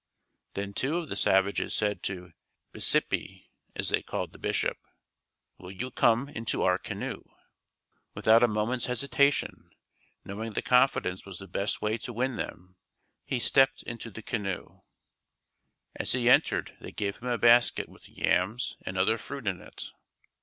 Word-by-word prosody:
Then 100 0 -3
two 140 +10 0
of 170 -4 -4
the - - -3
savages 95 +1 +2
said 105 -3 0
to 90 -2 -5 0.4
"Bisipi," - - 0 0.2
as - - -1
they - - +2
called - - -4
the - - -15
Bishop: - - 0 0.8
"Will 90 - -10
you 120 +7 -5
come 120 +3 +3
into 115 -5 -2
our 90 0 +3
canoe?" - - -5 0.9
Without 110 +1 +5
a 120 - +6
moment's 110 +3 -1
hesitation, 140 +3 +1 0.6
knowing 110 +3 -5
that - - -2
confidence 125 -8 +3
was 95 -3 -8
the 95 - -10
best 100 +2 -2
way 110 +2 0
to 120 - -7
win 125 +2 0
them, 90 +1 -6 0.5
he 130 - -1
stepped 135 +2 +4
into 115 0 -6
the 110 +1 -10
canoe. 100 -5 -4 1.1
As - - -1
he 125 -1 +1
entered 125 - +4
they - - -8
gave 100 -1 -2
him 125 - -7
a 120 -1 +1
basket 120 +1 +5
with - - -17
yams 95 +9 0
and 95 - -4
other 110 +5 +3
fruit 135 +2 -7
in 95 -3 -1
it. - - -9
110 Hz, 155 wpm, -29 LUFS, 95-125 Hz, 1.1 s, a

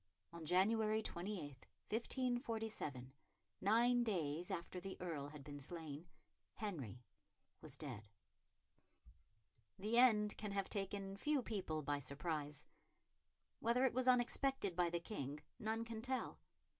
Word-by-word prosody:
On 165 -2 -6
January 215 +5 +4
28, 170 -10 -4 0.2
1547, 225 - -1 0.5
nine 240 +4 +5
days 170 -6 0
after 170 +2 -3
the 190 +1 -5
Earl 160 -6 -2
had 145 -1 -9
been 145 0 -7
slain, 160 +1 -5 0.5
Henry 135 - -4 0.6
was - - -5
dead. 105 - -5 1.8
The 215 +5 +3
end 210 -4 +6
can 210 -2 -3
have 195 -1 0
taken 195 -1 -2
few 295 +3 +2
people 170 -9 -2
by 145 0 +1
surprise. 150 +1 -2 0.9
Whether 240 +3 +4
it 260 - +3
was 255 +1 +1
unexpected 250 -4 +3
by 175 -1 +3
the 170 0 0
King 150 -6 -4 0.2
none 225 0 0
can 225 -1 -4
tell. 260 +2 -2
195 Hz, 120 wpm, -41 LUFS, 150-225 Hz, 1.8 s, end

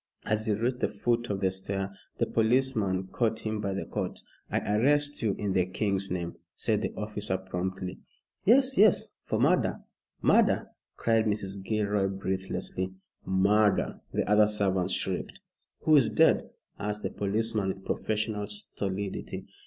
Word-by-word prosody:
As 110 +1 0
he 105 - +3
reached 120 +4 -1
the - - +2
foot 120 +3 -1
of 100 -1 -2
the 95 -1 +2
stair 95 +1 -4 0.2
the - - +2
policeman 110 -5 +1
caught 110 -2 0
him 110 -1 -1
by 100 -2 -2
the 100 - -3
coat. - - -4 0.3
"I - - +1 0.2
arrest 145 +4 +3
you 105 -4 +1
in 100 -2 -1
the 90 -1 +2
King's 100 0 0
name," 85 -1 -3 0.2
said 105 -2 0
the - - -2
officer, 105 -2 -2
promptly. 95 0 -4 0.4
"Yes, 260 +3 +5
yes! 210 -2 +5
for - - -1
murder - - +2 0.4
murder!" - - +3 0.3
cried 115 -1 +2
Mrs. 100 -2 -2
Gilroy, 105 -1 +1
breathlessly. 95 -1 -3 0.3
"Murder!" 100 +2 +2
the - - -1
other 105 0 +5
servants 95 -3 0
shrieked. - - -2 0.4
"Who 155 - +5
is 135 -6 +5
dead?" - - +3 0.3
asked 105 0 -3
the - - -2
policeman, 105 0 -1
with 95 0 -4
professional 105 -1 -1
stolidity. 100 -1 -4
105 Hz, 150 wpm, -29 LUFS, 95-110 Hz, 0.4 s, Yes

